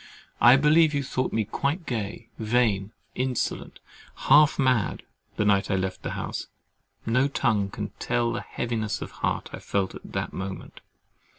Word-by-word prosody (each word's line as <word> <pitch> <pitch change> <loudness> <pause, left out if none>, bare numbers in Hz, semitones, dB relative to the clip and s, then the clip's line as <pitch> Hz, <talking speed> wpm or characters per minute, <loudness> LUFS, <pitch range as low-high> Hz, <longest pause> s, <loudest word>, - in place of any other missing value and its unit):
—I 120 +2 +9
believe 150 +2 +4
you 140 - 0
thought 130 -1 -2
me 110 -1 0
quite 145 - -2
gay, 115 -2 -4
vain, 110 -3 +1 0.2
insolent, 130 -1 -2 0.5
half 150 0 +7
mad, 130 -6 +1 0.3
the 105 - +1
night 100 -1 +3
I 100 - +2
left 95 0 -2
the - - -4
house—no 125 +4 -3
tongue 110 -8 +1
can - - -5
tell 120 -1 0
the 120 - -3
heaviness 110 -3 -3
of - - -9
heart - - -2
I - - -6
felt 95 -2 -1
at - - -11
that - - -3
moment. 95 0 -7
120 Hz, 155 wpm, -26 LUFS, 100-130 Hz, 0.5 s, I